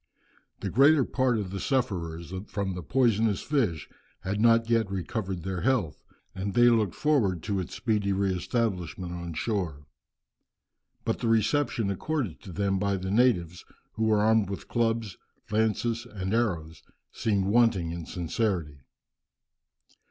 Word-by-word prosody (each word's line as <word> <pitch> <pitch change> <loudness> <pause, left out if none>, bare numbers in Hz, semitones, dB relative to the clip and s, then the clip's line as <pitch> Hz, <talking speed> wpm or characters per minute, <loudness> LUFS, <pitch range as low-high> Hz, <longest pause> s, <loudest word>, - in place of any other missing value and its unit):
The - - -3
greater 140 +3 +5
part 130 -3 +1
of 100 -4 -3
the 95 - -4
sufferers 90 - -2
from 100 -2 -2
the 90 - -5
poisonous 110 - +2
fish 115 - 0 0.3
had 100 +3 -2
not 115 0 +5
yet 115 -3 +2
recovered 95 -1 -3
their 95 -1 -3
health, 115 - 0 0.3
and 95 +1 -4
they 120 0 +7
looked 110 -6 +1
forward 110 - +1
to 100 -2 -1
its 90 - -5
speedy 105 -4 0
re 95 0 +1
establishment 90 -4 -2
on 85 -2 -6
shore. 80 -7 -2 1.2
But - - -1
the - - -1
reception 115 0 +1
accorded 115 - -3
to 95 - -10
them 95 +1 0
by 100 0 0
the 95 +1 -4
natives, 100 -7 +2 0.3
who 110 - -1
were 110 -1 +3
armed 110 -2 +3
with 100 - -6
clubs, 115 -4 -1 0.3
lances, 110 +2 0
and 95 -1 -3
arrows, 85 -9 -1 0.3
seemed 100 -4 0
wanting 100 -5 +3
in 85 -1 -6
sincerity. 85 -4 -2
100 Hz, 145 wpm, -28 LUFS, 90-115 Hz, 1.2 s, they